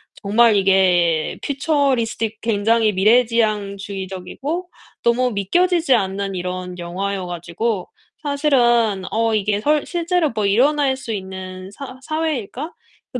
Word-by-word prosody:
정말 220 +2 +3
이게 180 -4 +3
퓨처리스틱 265 -6 0
굉장히 225 0 +2
미래지향주의적이고 210 - 0 0.3
너무 245 +1 +2
믿겨지지 330 - +2
않는 195 -3 -1
이런 180 0 -5
영화여 185 +2 -3
가지고 175 +4 -3 0.4
사실은 240 -8 +2
'어 225 0 +1
이게 210 0 0
설 300 +4 +2
실제로 345 -3 0
뭐 215 -2 -1
일어날 270 +6 +3
수 235 -4 -5
있는 190 -1 -7
사 260 +3 -9
사회일까?' 310 - -3 0.4
그 250 - -3
220 Hz, 275 characters per minute, -20 LUFS, 195-265 Hz, 0.4 s, 정말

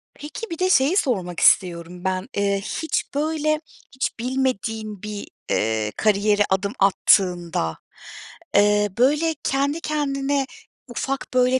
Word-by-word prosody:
Peki, 305 +10 -7
bir 335 - -6
de 370 - +2
şeyi 305 +2 +4
sormak 185 - 0
istiyorum 175 -1 +2
ben. 185 0 -2
Eee, 200 -1 +1
hiç 320 +10 -2
böyle, 310 0 0 0.3
hiç 260 -2 -3
bilmediğin 225 -5 -2
bir, 210 -1 -6 0.2
eee, 110 -1 0
kariyere 210 0 +2
adım 195 +1 0
attığında, 175 - +2 0.8
eee, 205 0 +4
böyle 300 +6 +3
kendi 280 +4 0
kendine, 280 -2 0 0.4
ufak 270 +3 -3
böyle 255 +1 +3
225 Hz, 120 wpm, -23 LUFS, 195-280 Hz, 0.8 s, şeyi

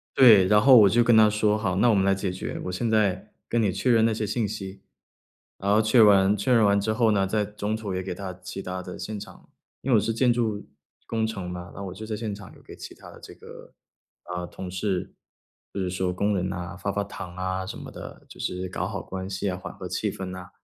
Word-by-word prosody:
对。 110 -8 +8
然 105 +1 +5
后 130 +3 +7
我 105 -3 +7
就 120 +4 +4
跟 120 0 +4
他 110 -1 +7
说： 105 0 +1
“好， 100 -4 -1
那 120 +5 +4
我 110 - +4
们 95 - +2
来 100 0 +3
解 95 -1 -2
决， 90 - -5
我 90 - -3
现 115 +6 -2
在 105 -2 0 0.2
跟 120 - +1
你 105 -3 +2
确 125 +7 0
认 115 -1 +4
那 115 - +2
些 110 0 -2
信 105 +1 -1
息。 95 0 -7 0.8
“然 100 +1 0
后 105 +2 +5
确 110 +3 +3
认 110 - +8
完 100 0 +5
确 100 +6 -1
认 115 -2 +5
完 100 0 +3
之 110 +2 -1
后 110 0 +3
呢， 100 -2 +2
在 105 +1 0
中 105 +1 -3
途 110 -3 -5
也 95 - -2
给 95 -1 -5
他 95 -1 -6
其 95 - -6
它 90 -1 -5
的 90 0 -8
现 110 -1 -5
场。 - - -13 0.3
因 135 - -2
为 - - +6
我 - - +6
是 115 - -1
建 125 +2 +3
筑 110 -4 -1 0.4
工 110 -1 -1
程 100 -5 -5
嘛， 90 0 -7
那 100 - -7
我 95 -2 -6
就 110 +4 -8
在 110 0 -4
现 105 -1 -4
场 100 -2 -12
有 - - -18
给 - - -12
其 - - -10
他 - - -14
的 - - -14
这 - - -12
个， - - -14 0.6
呃， 90 0 -3
同 90 +1 -8
事， 95 0 -3 0.6
就 - - -4
是 90 - -1
说 90 0 -1
工 100 +3 0
人 90 -1 -1
呐， 90 -2 -6
发 100 +2 -2
发 100 +1 -1
糖 95 -3 -9
啊 95 0 -3
什 - - -7
么 - - -9
的， - - -10
就 - - -13
是 90 0 -3
搞 - - -3
好 - - -5
关 95 0 -6
系 100 +1 -2
啊， 90 - -3
缓 90 0 -8
和 - - -7
气 - - -2
氛 95 - -6
呐。 90 -1 -8
100 Hz, 285 characters per minute, -25 LUFS, 95-110 Hz, 0.8 s, 对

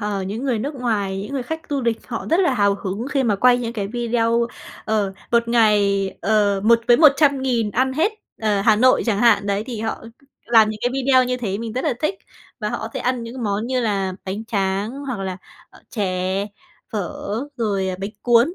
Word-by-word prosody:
ờ, 205 -2 -2
những 210 +7 -4
người 245 -5 0
nước 280 +6 -3
ngoài, 205 -6 -1
những 240 - -7
người 265 -3 -2
khách 320 +5 -6
tu 285 -2 -1
địch 235 -2 0
họ 230 -2 -5
rất 340 +4 +4
là 280 -8 +2
hào 200 -3 +3
hứng 200 +6 -3
khi 275 -2 +1
mà 210 -5 +1
quay 245 +3 +4
những 235 -1 -3
cái 205 -4 -3
video, 235 0 +1 0.4
ờ, 210 -3 0 0.2
1 235 0 +2
ngày, 205 -4 +3
ờ, 200 0 +2
một 230 +1 +5
với 240 - +7
100.000 275 -7 +3
ăn 260 +4 +1
hết, 330 +10 +1 0.3
ờ, 210 -2 +1
Hà 215 +1 +4
Nội 255 +4 +4
chẳng 205 -3 +1
hạn, 215 -3 +4
đấy, 200 +1 -1
thì 235 -4 -5
họ 220 0 -4 0.4
làm 225 -2 +5
những 215 - -7
cái 245 - +1
video 265 -1 +3
như 250 0 -1
thế 205 -5 -3
mình 225 -1 -5
rất 255 - -3
là - - +1
thích. 310 +6 +1 0.5
Và - - -1
họ - - -3
có - - -5
thể - - -3
ăn 250 -1 -1
những 235 +2 -7
món 210 +2 -1
như 255 0 0
là 195 -4 -1
bánh 200 +4 -4
tráng 200 -1 -1
hoặc 260 -8 -4
là, 190 -1 -3 0.3
ờ, - - -18
chè, 190 -1 -1 0.5
phở, 200 -5 -3 0.4
rồi, 200 -5 -1
à, 185 - -3
bánh 195 +2 -3
cuốn, 240 +8 +4
225 Hz, 220 wpm, -21 LUFS, 200-250 Hz, 0.5 s, với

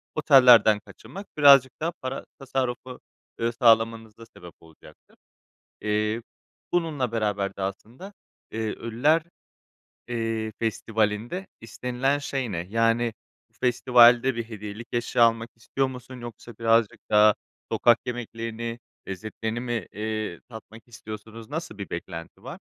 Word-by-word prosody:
otellerden 125 -8 +7
kaçınmak 195 - -12
birazcık 140 -3 +7
daha 165 +2 0
para 130 +1 -5
tasarrufu, 130 -2 -3 0.4
ııı, 115 +1 0
sağlamanıza 115 -2 +2
sebep 90 -6 -14
olacaktır. 80 -1 -19 0.7
Eee, 105 +2 -1 0.5
bununla 150 -9 0
beraber 105 -3 -1
de 95 - -5
aslında, 115 - -6 0.4
iii, 110 - -5
Ölüler, 140 +8 +1 0.9
iii, 115 -2 -2
Festivali'nde 110 - -1
istenilen 125 +5 -1
şey 135 -5 -3
ne? 85 - -2
Yani, 115 +1 +2 0.4
bu - - -39
festivalde 125 0 +5
bir 115 - -2
hediyelik 105 +1 -8
eşya 120 0 +1
almak 115 0 +1
istiyor 135 +4 -1
musun 125 -1 -9
yoksa 120 0 -10
birazcık 115 -1 +2
daha 105 0 +6 0.4
sokak 120 -1 +4
yemeklerini, 115 -1 -5 0.3
lezzetlerini 110 +4 -4
mi, 120 -5 -3
iii, 110 -3 -4
tatmak 110 0 -12
istiyorsunuz? 110 +1 -10
Nasıl 155 -8 -5
bir 100 - -7
beklenti 85 -1 -7
var? - - -8
115 Hz, 120 wpm, -25 LUFS, 110-125 Hz, 0.9 s, otellerden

